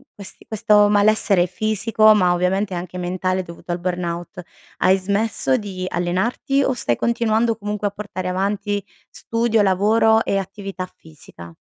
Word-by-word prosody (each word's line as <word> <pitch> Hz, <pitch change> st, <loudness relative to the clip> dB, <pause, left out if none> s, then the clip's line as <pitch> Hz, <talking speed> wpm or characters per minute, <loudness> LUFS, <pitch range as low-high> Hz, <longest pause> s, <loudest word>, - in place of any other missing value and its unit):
questi 200 Hz, -2 st, -9 dB
questo 210 Hz, -2 st, +3 dB
malessere 205 Hz, -3 st, +3 dB
fisico, 215 Hz, +2 st, +2 dB
ma 180 Hz, -3 st, +3 dB
ovviamente 185 Hz, +2 st, 0 dB
anche 180 Hz, +1 st, -6 dB
mentale 185 Hz, +1 st, -2 dB
dovuto 170 Hz, 0 st, -9 dB
al 175 Hz, -, -2 dB
burnout 175 Hz, +1 st, -4 dB, 0.4 s
hai 190 Hz, +1 st, +3 dB
smesso 205 Hz, +6 st, 0 dB
di 195 Hz, -5 st, -6 dB
allenarti 190 Hz, +11 st, 0 dB
o 265 Hz, -, +1 dB
stai 120 Hz, -, 0 dB
continuando 230 Hz, -, +1 dB
comunque 210 Hz, -1 st, -3 dB
a -, -, -3 dB
portare 200 Hz, -3 st, -6 dB
avanti 200 Hz, +2 st, -2 dB, 0.3 s
studio, 230 Hz, -1 st, 0 dB
lavoro 220 Hz, +3 st, +3 dB
e 195 Hz, -, 0 dB
attività 195 Hz, -1 st, -5 dB
fisica? 85 Hz, -, -14 dB
200 Hz, 140 wpm, -21 LUFS, 180-215 Hz, 0.4 s, questo